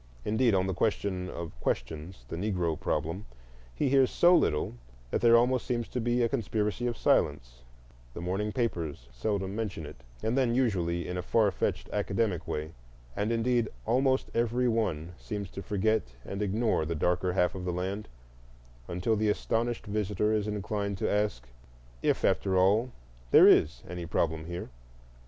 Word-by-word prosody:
Indeed, 110 0 +3
on 95 0 +2
the 95 - -1
question 95 -2 -1
of 85 -3 -6
questions—the 80 -3 -4
Negro 90 -3 -1
problem—he - - -4
hears 135 -1 +4
so 175 +1 +5
little 75 - +1 0.4
that - - 0
there 115 0 +7
almost 125 +1 +2
seems 120 -2 -1
to 125 - -2
be 120 +1 +1
a - - +4
conspiracy 115 -2 -1
of 120 - -2
silence; - - +1 0.5
the - - -5
morning 95 +5 -2
papers 85 - -2
seldom 95 - -2
mention 105 -8 -3
it, - - -10 0.3
and 110 +2 +1
then 125 -3 +2
usually 90 -9 0
in 90 - -3
a - - -1
far 105 +3 +2
fetched - - -2
academic 100 -4 0
way, 75 +1 -3 0.4
and 105 +3 0
indeed 115 0 +1 0.2
almost 130 - +2
every 120 +2 +1
one 95 -9 0
seems 100 -3 -5
to 100 - -6
forget 100 - 0
and 100 +1 -5
ignore 105 -2 +1
the 85 +2 -2
darker 90 +3 +1
half 90 -1 +2
of 95 - -6
the 90 - -1
land, 95 +4 -3 0.8
until 90 +6 0
the 105 0 +1
astonished 115 +3 -1
visitor 105 0 0
is 105 -1 0
inclined 100 -1 -2
to - - -1
ask 105 -12 0 0.5
if - - +1
after 95 -2 +2
all 105 +7 +3 0.4
there - - +8
IS 75 - +4
any 90 -1 -5
problem 80 -1 0
here. 85 -2 -5
100 Hz, 160 wpm, -29 LUFS, 85-115 Hz, 0.8 s, there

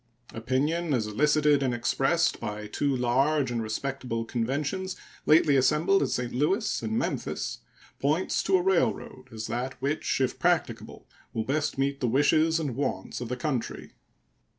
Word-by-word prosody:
Opinion, 145 +7 0
as 115 -4 0
elicited 150 +6 +3
and 130 -3 0
expressed 135 +8 +1
by 105 -2 -5
two 140 +6 -1
large 130 +3 +2
and 120 -1 -1
respectable 115 +1 -3
conventions 145 +11 -2 0.3
lately 155 -2 +5
assembled 155 +9 +3
at - - +1
St. 125 -1 -2
Louis 190 - 0
and 110 -1 -2
Memphis, - - -3 0.4
points 155 +7 +1
to 190 - +4
a 180 - -1
railroad 175 -7 0
as 110 -1 -6
that 125 +2 -4
which, 140 +2 -1
if 130 -2 0
practicable, - - -1 0.3
will 110 - -1
best 145 +2 -1
meet 140 +1 0
the 125 - 0
wishes 155 +6 +3
and 145 -7 -3
wants 140 -2 -3
of 120 - -5
the 125 - -3
country. 130 -3 -3
135 Hz, 150 wpm, -27 LUFS, 120-155 Hz, 0.4 s, lately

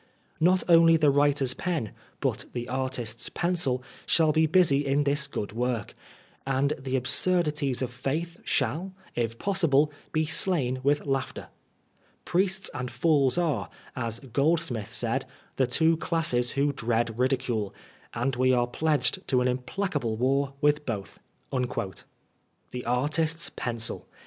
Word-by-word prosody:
Not 180 +3 +3
only 165 -1 +6
the 150 -3 +4
wiiter^s 140 -2 +2
pen, 165 - -2 0.3
but - - -1
the 120 0 -4
artist's 125 -3 -3
pencil, 170 -8 0 0.2
shaU 160 -2 +4
be 160 +1 +3
busy 145 -5 +3
uk 145 +1 +2
this 140 0 +1
good 105 -7 -4
work; 120 -1 -2 0.5
and 135 +2 +1
the 135 0 -3
absurdities 150 -1 +1
of 125 - -3
faith 155 +7 -3
shall, 185 +5 -1 0.2
if 115 -1 -2
possible, 155 -6 +2 0.2
be 155 0 +1
stain 150 -5 +3
with 145 +3 +1
laughter. 135 -2 -3 0.8
Priests 190 +1 +1
and 125 0 -4
fools 145 -3 +2
are, 140 - 0 0.3
as 115 -2 -3
Groldsmith 140 -4 -1
said, 120 +3 0 0.3
the 130 - +2
two 160 +6 +2
classes 155 -8 +1
who 140 +1 +2
dread 115 -2 -1
ridicule, 125 -5 0 0.4
and 125 +3 -1
we 130 +1 +3
are 120 -1 +3
pledged 155 +7 0
to 130 - +3
an 125 - +1
implacable 125 - -2
war 135 +3 +1
with 150 0 +3
both." 105 -7 -5 1.5
The 125 0 -6
artist's 155 +7 0
pencil 115 -2 -2
135 Hz, 135 wpm, -27 LUFS, 125-160 Hz, 1.5 s, only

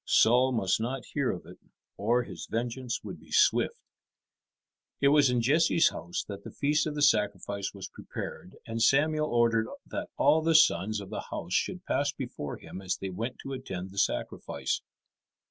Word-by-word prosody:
Saul 125 +3 +5
must 110 -4 +1
not 125 +1 -3
hear - - +1
of - - -4
it, - - -13 0.4
or 120 +4 +1
his - - -8
vengeance 120 +1 -3
would - - -7
be - - -18
swift. - - +3 1.2
It 140 - +4
was 145 -2 +5
in 125 -1 +2
Jesse's 160 +5 +4
house 85 - -4
that 100 -1 -7
the - - -7
feast 150 +2 +1
of 150 - -4
the 145 - 0
sacrifice 100 -5 +1
was 95 - -6
prepared, 90 - -8
and 115 0 -4
Samuel 150 +4 +3
ordered 115 -1 +3 0.2
that - - -5
all 160 - +4
the 165 0 +2
sons 110 - +4
of 95 - -10
the - - -4
house 85 +2 -5
should 185 - -1
pass 140 0 +1
before 120 - -6
him 95 - -9
as 95 -1 -2
they 95 - -5
went 115 +7 -4
to 135 - -5
attend 95 -8 -6
the 100 - -3
sacrifice. - - -1
120 Hz, 180 wpm, -29 LUFS, 100-140 Hz, 1.2 s, Saul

